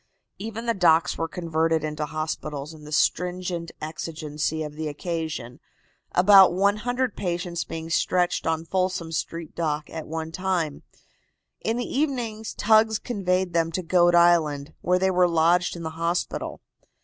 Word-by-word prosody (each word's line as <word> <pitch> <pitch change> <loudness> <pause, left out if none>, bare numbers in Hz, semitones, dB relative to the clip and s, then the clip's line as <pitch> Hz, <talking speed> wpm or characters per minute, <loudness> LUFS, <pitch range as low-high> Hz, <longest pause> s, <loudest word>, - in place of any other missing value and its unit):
Even 225 +2 -5
the 230 - +2
docks 175 -3 +3
were 165 - -2
converted 165 -2 0
into 150 0 -3
hospitals 155 -1 -4
in 155 -1 -13
the 150 - -10
stringent 180 +1 0
exigency 155 0 -3
of 150 -1 -6
the 155 +1 -4
occasion, 155 -5 -4 0.5
about 190 0 +7
100 210 +7 0
patients 175 -2 -2
being 160 0 -6
stretched 175 +1 +1
on 160 0 0
Folsom 185 -2 -1
street 165 0 -4
dock 150 -2 -2
at 160 -1 -6
one 160 0 -4
time. 175 -4 -1 0.8
In 225 +1 0
the 245 - -2
evening 245 -7 -2
tugs 220 0 +4
conveyed 185 -6 -1
them 165 -1 +1
to 185 - -2
Goat 175 0 +4
Island, 160 -4 +3
where 180 +1 +2
they 190 +1 +2
were 180 -1 +4
lodged 170 +2 +2
in 170 - -7
the 160 - -4
hospital. 170 +2 -2
170 Hz, 150 wpm, -25 LUFS, 160-185 Hz, 0.8 s, about